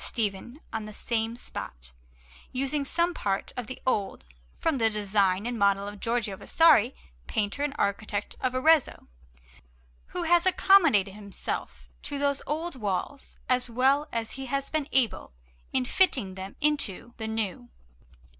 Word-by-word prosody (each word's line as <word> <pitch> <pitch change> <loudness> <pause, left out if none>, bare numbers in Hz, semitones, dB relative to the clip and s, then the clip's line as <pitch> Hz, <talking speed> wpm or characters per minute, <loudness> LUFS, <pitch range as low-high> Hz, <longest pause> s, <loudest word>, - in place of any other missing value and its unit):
Stephen 225 +4 -3
on 220 -1 -3
the 215 - -9
same 225 -1 -1
spot, - - -7 0.6
using 275 +3 0
some 340 +5 0
part 195 - -2
of 245 -3 -5
the 260 - -7
old, 205 - -1 0.3
from 315 -5 0
the 225 -1 +4
design 200 -2 +1
and 240 -1 -3
model 200 0 +2
of 205 0 -8
Giorgio 230 -3 -1
Vasari, 270 - +4 0.3
painter 205 - -1
and 290 -1 -1
architect 205 0 -2
of 255 0 -1
Arezzo, 310 +2 +3 1.0
who 355 - -4
has 345 +2 +4
accommodated 325 - +5
himself 190 - -6
to 285 - -4
those 280 0 +1
old 320 +2 -2
walls 215 +4 -4
as 250 -1 +1
well 265 +5 +2
as 230 -1 -2
he 270 0 -6
has 275 +1 -2
been 310 -2 -1
able 245 - +2 0.4
in 260 -1 +1
fitting 250 - +3
them 190 +1 -8
into 240 -6 0
the 220 -2 -4
new. 210 - -3
235 Hz, 145 wpm, -27 LUFS, 205-280 Hz, 1.0 s, accommodated